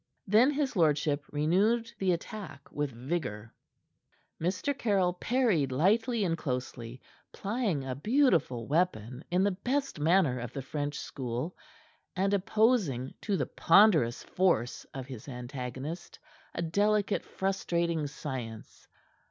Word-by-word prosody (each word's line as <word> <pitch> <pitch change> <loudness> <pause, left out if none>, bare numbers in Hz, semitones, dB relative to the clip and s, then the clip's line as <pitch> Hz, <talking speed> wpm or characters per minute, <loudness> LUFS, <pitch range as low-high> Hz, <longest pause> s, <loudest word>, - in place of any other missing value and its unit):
Then 220 +7 +5
his 285 -3 -1
lordship 150 -3 +2
renewed 200 +10 +2
the 190 -1 +2
attack 175 -4 -6
with 145 -1 -1
vigor. 125 -4 -4 0.9
Mr. 185 - 0
Caryll 195 -8 +1
parried 195 - +1
lightly 215 - +2
and 170 -3 +1
closely, 125 -4 -4 0.3
plying 200 - -2
a 130 - -2
beautiful 170 - +2
weapon 135 - 0
in 180 +2 +2
the 200 - +3
best 255 - -2
manner 155 -5 +3
of 120 0 -6
the 135 - -4
French 145 +1 -3
school, 130 +6 -4 0.6
and 195 +2 +1
opposing 200 - +2
to 205 -3 0
the - - 0
ponderous 165 - +4
force 175 -11 0
of 135 -1 -6
his 130 -3 -9
antagonist 130 +5 -6 0.4
a 170 - -1
delicate 205 +4 +1
frustrating 170 -5 -1
science. 125 -7 -7
170 Hz, 120 wpm, -30 LUFS, 130-200 Hz, 0.9 s, Then